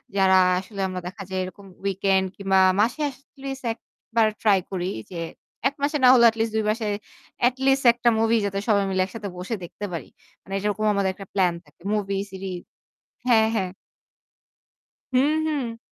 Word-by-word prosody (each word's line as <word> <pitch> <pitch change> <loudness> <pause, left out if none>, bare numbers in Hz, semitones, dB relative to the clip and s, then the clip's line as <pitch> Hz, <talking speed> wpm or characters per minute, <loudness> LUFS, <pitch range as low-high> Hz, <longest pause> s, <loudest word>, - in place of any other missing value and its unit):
যারা 190 -1 +5 0.2
আসলে 195 +2 -10
আমরা 185 -1 -4
দেখা 190 +3 -8
যাই 190 0 -2
এরকম 185 +2 -9 0.2
উইকেন্ড 195 0 +2
কিংবা 195 -1 +2 0.2
মাসে 235 +8 +2
এটলিস্ট 270 0 -9
১ 225 - -6 0.4
বার 225 -1 +5
ট্রাই 205 -4 +4
করি 180 -2 -2 0.2
যে 180 - -6 0.5
১ 275 - -2
মাসে 295 +1 +1
না - - +8
হলেও 235 -2 +7
এটলিস্ট 225 0 -2
২ 220 - +1
মাসে 220 +1 -3 0.6
এটলিস্ট 270 +2 +2
১ 235 - -11
টা 240 - +6
মুভি 225 +1 +3
যাতে 195 0 -1
সবাই 205 -3 +4
মিলে 190 -1 +1
একসাথে 205 +1 -7
বসে 185 +6 -3
দেখতে 190 +4 -6
পারি। 170 - -5 0.3
মানে 195 - -10
এটারকম 210 +2 -1
আমাদের 200 -1 +1
একটা 195 +1 -10
প্লান 185 -3 +3
থাকে। 145 +2 -26
মুভি, 200 -2 -1
সিরিজ 190 -2 -5 0.7
হ্যাঁ, 220 -2 +5
হ্যাঁ। 190 -3 -1 1.4
হু, 255 - +5 0.3
হু। 270 -7 -2
205 Hz, 170 wpm, -24 LUFS, 190-230 Hz, 1.4 s, না